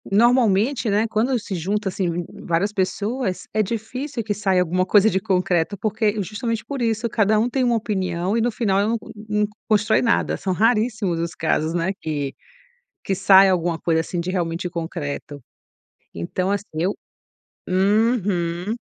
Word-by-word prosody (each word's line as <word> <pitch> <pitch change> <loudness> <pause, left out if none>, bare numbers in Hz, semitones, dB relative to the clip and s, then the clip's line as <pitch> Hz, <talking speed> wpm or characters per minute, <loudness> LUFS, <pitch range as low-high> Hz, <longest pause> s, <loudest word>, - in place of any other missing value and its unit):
normalmente, 235 0 +3
né, 210 +2 +2
quando 235 +4 +1
se 205 -3 -6
junta 195 +4 -1
assim 175 -2 -2 0.2
várias 175 +5 +1
pessoas, 200 +2 -2
é 215 - +2
difícil 235 +5 -4
que 210 - -1
saia 195 -2 +1
alguma 180 +1 +1
coisa 205 +3 +5
de 190 - 0
concreto, 185 -1 0
porque 215 0 0
justamente 225 +3 -3
por 275 -3 -4
isso, 225 0 0
cada 215 0 +2
um 230 +3 +2
tem 265 +2 -1
uma 240 - +2
opinião, 190 -2 -1
e - - +2
no 240 - +2
final 200 -4 +1
eu 205 - +2
não 230 - +1 0.3
não 210 0 +1 0.2
constrói 215 0 +3
nada, 235 - +1
são 190 -2 -2
raríssimos 215 -4 +1
os 165 -1 -3
casos, 160 0 0
né, 175 +2 0
que 145 -3 -3 0.7
que 195 - -1
sai 195 +1 +7
alguma 175 -2 0
coisa 165 -1 +1
assim 170 +1 -3
de 175 - -3
realmente 175 -1 -2
concreto, 155 -4 -5 0.7
então 180 - -2
assim 205 0 -1 0.2
eu 185 +4 +1 0.8
uhum. 195 -2 +1
200 Hz, 160 wpm, -22 LUFS, 180-220 Hz, 0.8 s, sai